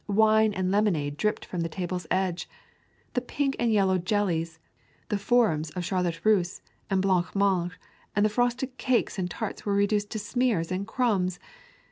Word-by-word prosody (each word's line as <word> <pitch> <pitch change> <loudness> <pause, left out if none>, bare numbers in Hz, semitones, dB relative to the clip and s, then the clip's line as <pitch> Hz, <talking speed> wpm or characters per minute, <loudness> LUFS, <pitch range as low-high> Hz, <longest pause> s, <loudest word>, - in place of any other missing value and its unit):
Wine 220 +1 +4
and 185 0 0
lemonade 175 -9 +1
dripped 210 +7 -1
from 180 - -4
the 165 - -2
table's 180 0 -4
edge. 185 -2 -1 0.6
The 250 - +1
pink 275 +2 -1
and 235 -1 +2
yellow 190 -3 +3
jellies, 170 -4 -1 0.5
the 210 - +1
forms 200 -9 +2
of 180 -1 -3
Charlotte 175 -3 -1
Russe 195 -4 +2 0.3
and 190 -1 +1
blanc 185 -2 +1
mange 190 -3 +2 0.4
and 205 +1 +3
the - - +3
frosted 245 +3 -1
cakes 245 -5 0
and 180 -1 -1
tarts 220 +3 -5
were 200 -1 0
reduced 205 +1 +1
to 220 - -4
smears 215 -5 0
and 190 +2 -2
crumbs. 205 -7 +1
200 Hz, 165 wpm, -27 LUFS, 180-220 Hz, 0.6 s, Wine